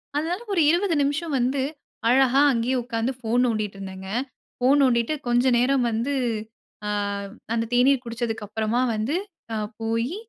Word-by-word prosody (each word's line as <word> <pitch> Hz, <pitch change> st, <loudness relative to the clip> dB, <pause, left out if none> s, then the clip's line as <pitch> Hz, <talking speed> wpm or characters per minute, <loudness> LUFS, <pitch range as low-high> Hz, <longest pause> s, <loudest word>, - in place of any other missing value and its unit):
அதனால, 330 Hz, +6 st, -1 dB
ஒரு 345 Hz, -, +3 dB
20 345 Hz, +1 st, +2 dB
நிமிஷம் 290 Hz, +3 st, -1 dB
வந்து 260 Hz, +3 st, +1 dB, 0.5 s
அழகா 265 Hz, +1 st, +5 dB
அங்கேயே 245 Hz, +1 st, 0 dB
உட்காந்து 230 Hz, +1 st, -1 dB
ஃபோன் 240 Hz, +1 st, +1 dB
நோண்டிட்டு 215 Hz, -4 st, -1 dB
இருந்தேங்க. 190 Hz, 0 st, -7 dB, 0.5 s
ஃபோன் 265 Hz, +3 st, +4 dB
நோண்டிட்டு 235 Hz, +2 st, +2 dB, 0.2 s
கொஞ்சம் 245 Hz, +1 st, +3 dB
நேரம் 260 Hz, +1 st, +2 dB
வந்து 235 Hz, +6 st, -1 dB, 0.7 s
ஆ -, -, -1 dB, 0.6 s
அந்த 230 Hz, 0 st, 0 dB
தேநீர் 255 Hz, +1 st, +4 dB
குடிச்சதுக்கப்புறமா 225 Hz, -1 st, -2 dB, 0.2 s
வந்து 220 Hz, +9 st, -1 dB, 0.4 s
ஆ -, -, -1 dB, 0.3 s
போயி, 230 Hz, +7 st, -1 dB
245 Hz, 135 wpm, -24 LUFS, 225-275 Hz, 0.7 s, அழகா